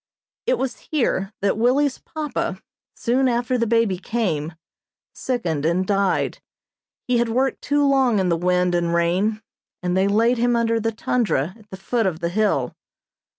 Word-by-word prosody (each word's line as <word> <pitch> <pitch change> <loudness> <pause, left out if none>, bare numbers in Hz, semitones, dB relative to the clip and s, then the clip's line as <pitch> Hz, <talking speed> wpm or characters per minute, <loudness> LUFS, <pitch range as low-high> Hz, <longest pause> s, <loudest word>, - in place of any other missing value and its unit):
It - - +3
was 265 - -3
here 220 -9 0
that 200 +2 +1
Willie's 265 +4 +2
papa, 290 -11 -4 0.4
soon 260 +3 +1
after 245 +1 0
the 235 -2 +1
baby 225 -5 +2
came, 175 -8 -2 0.6
sickened 175 - -2
and 170 +4 +1
died. 195 -1 0 0.7
He 250 -1 +2
had 235 -1 +1
worked 260 +3 0
too 290 0 +1
long 265 -5 +3
in 190 -2 +1
the 170 - +3
wind 180 +1 +1
and 170 -1 +1
rain, 190 +6 +1 0.4
and 180 0 0
they 190 +1 +3
laid 230 +4 +2
him 240 0 +2
under 230 -1 +1
the 225 +1 -1
tundra 215 - 0
at 215 -2 -20
the 190 - -8
foot 225 +3 0
of 165 -4 -2
the 170 0 -1
hill. 180 -10 0
220 Hz, 165 wpm, -22 LUFS, 180-245 Hz, 0.7 s, It